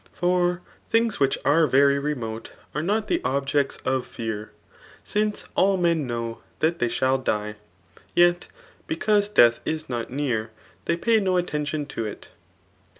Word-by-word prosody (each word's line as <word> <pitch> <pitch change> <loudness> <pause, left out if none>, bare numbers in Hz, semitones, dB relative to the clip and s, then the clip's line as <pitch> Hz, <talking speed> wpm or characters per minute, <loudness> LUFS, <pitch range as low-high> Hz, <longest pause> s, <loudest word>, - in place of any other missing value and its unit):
Far 180 0 +1 0.3
idings 225 -1 +2
which 135 -1 +2
are 155 +3 +4
very 140 +1 +4
remote 120 -6 -4 0.2
are 150 - -1
not 210 +5 0
the - - +1
ibbjectsof 135 -1 0
fear; 110 -3 -5 0.5
sinoe 210 0 -1
all 195 0 +3
men 170 -5 +1
know 115 -1 -4 0.2
that 165 +2 0
they 120 - +1
shall 130 +3 +1
die, 105 -4 -2 0.6
yet 175 0 +4 0.4
because 205 +5 +1
deat^ 120 - +5
Js 155 -2 -3
Mt 120 -2 -3
near, 125 -5 -1 0.4
they 170 - +1
pay 225 +4 +3
no 185 -3 +1
attention 150 -3 -2
to 125 -5 -5
it. 105 - -9
145 Hz, 145 wpm, -24 LUFS, 125-175 Hz, 0.6 s, deat^